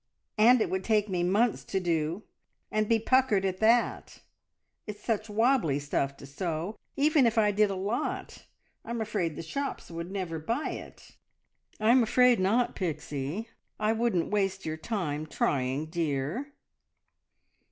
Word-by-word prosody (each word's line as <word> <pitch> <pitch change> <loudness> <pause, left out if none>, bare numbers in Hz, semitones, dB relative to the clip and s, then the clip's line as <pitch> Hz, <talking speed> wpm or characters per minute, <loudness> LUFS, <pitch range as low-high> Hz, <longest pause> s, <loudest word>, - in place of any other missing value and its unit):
"And 240 +2 +6
it - - 0
would 190 0 -1
take 215 -1 +2
me 180 -2 0
months 205 +6 +2
to 195 - -1
do, 170 +1 -1 0.5
and 215 0 0
be 230 - +5
puckered 225 -4 +2
at 185 -1 -2
that! 230 +2 +2 0.7
It's 210 0 -7
such 220 -1 -1
wobbly 225 - +2
stuff 140 -1 -2
to - - -11
sew. 165 +6 -4 0.2
Even 290 -2 +4
if 230 0 -1
I 210 -2 +4
did 210 0 +3
a 195 - -2
lot, 200 +6 -3 0.4
I'm 235 0 -4
afraid 205 -8 -2
the - - -6
shops 275 - -4
would 170 +1 -5
never 185 -4 -4
buy 230 - -2
it." - - -10 0.6
"I'm 235 +4 +5
afraid 245 +1 +4
not, 220 +6 +2
Pixie. 155 - -4 0.3
I 215 +1 +2
wouldn't 225 -7 0
waste 195 -2 0
your 155 0 -2
time 160 -5 -3
trying, 135 0 0
dear!" 160 - -2
200 Hz, 150 wpm, -29 LUFS, 165-225 Hz, 0.7 s, And